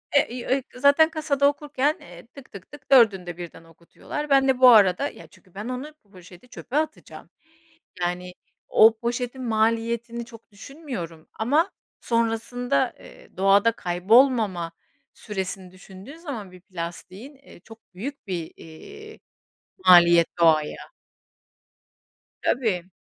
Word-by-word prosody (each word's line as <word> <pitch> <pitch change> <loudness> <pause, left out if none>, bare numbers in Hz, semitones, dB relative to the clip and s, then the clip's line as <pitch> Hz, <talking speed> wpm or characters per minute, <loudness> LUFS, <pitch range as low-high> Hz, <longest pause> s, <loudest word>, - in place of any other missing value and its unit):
Eee, 285 - +4
iii, 245 0 -6
eee, 265 +2 0
kasada - - -31
onu 250 - -11
zaten 285 +3 +5
kasada 295 -3 -1
okurken, 290 +1 -1
eee, 175 +4 -14
tık, 270 +1 -16
tık, 200 +3 -13
tık 290 -2 -15
4'ünde 190 -9 +4
birden 170 -1 -10
okutuyorlar. 170 - -8
Ben 270 -1 +4
de 260 -1 +1
bu 255 -1 +8
arada, 215 +4 +5
ya, - - -14
çünkü 185 -4 -24
ben 210 +4 -6
onu, 260 +4 -6
bu 205 - -32
poşeti 180 +4 -16
çöpe 275 - -6
atacağım. 310 0 -5 0.7
Yani 180 +1 -3 0.4
o 220 0 +5
poşetin 245 +2 -4
maliyetini 230 +1 -1
çok 230 -1 -16
düşünmüyorum 205 - -9
ama 300 - +1 0.3
sonrasında, 230 +3 -1
eee, - - -17
doğada 200 +4 +4
kaybolmama 195 -2 +2 0.4
süresini 190 -2 -6
düşündüğün 190 +9 -13
zaman 245 - -8
bir 180 - -15
plastiğin, 185 - -9
eee, 270 -9 -18
çok 225 -2 -18
büyük 270 +6 -7
bir, 170 -4 -5
eee, 420 - -13 0.7
maliyet 170 -2 +7
doğaya. 155 -3 +3 1.7
Tabii. 190 -8 -1
225 Hz, 135 wpm, -24 LUFS, 180-270 Hz, 1.7 s, bu